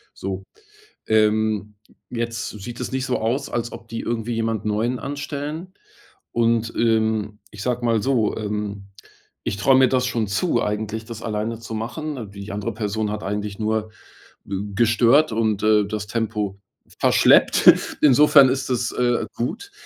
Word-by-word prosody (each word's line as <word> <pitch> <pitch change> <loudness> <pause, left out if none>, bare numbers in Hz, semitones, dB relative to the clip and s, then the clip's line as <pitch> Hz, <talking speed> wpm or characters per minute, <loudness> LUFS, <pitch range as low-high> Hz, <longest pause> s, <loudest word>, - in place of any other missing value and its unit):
so. 95 0 -5 0.7
Ähm, 110 -1 +2 0.4
jetzt 115 -1 -3
sieht 115 +4 -8
es - - -4
nicht 130 0 -1
so 130 - 0
aus, 125 +6 -1
als 120 0 -3
ob 115 - -10
die 115 - -5
irgendwie 115 0 -2
jemanden 115 -2 -1
neuen 115 +4 0
anstellen. 145 +5 -5 0.6
Und, 115 -1 +1
ähm, 110 -2 +1
ich 105 - -9
sage 125 0 -1
mal 115 -3 +2
so, 120 -5 +1
ähm, 105 -2 -4 0.6
ich - - -2
traue 130 +6 +4
mir 130 -1 +6
das 125 0 +1
schon 115 -4 -1
zu 120 - +1
eigentlich, 110 +1 -3
das 115 -1 -8
alleine 110 0 -3
zu 115 -1 -7
machen. 125 +1 -5
Die 100 0 -8
andere 100 0 -3
Person 105 0 -2
hat 105 0 -4
eigentlich 105 0 -3
nur 110 0 -1 0.5
gestört 110 +8 +2
und, 110 -2 0
äh, 105 -1 +4
das 105 0 -4
Tempo 105 -3 -2 0.4
verschleppt. - - +6 0.3
Insofern 145 -1 +7
ist 135 0 -2
das, 120 -1 0
äh, 120 -1 +1
gut. 220 - -4
110 Hz, 150 wpm, -22 LUFS, 105-125 Hz, 0.7 s, Insofern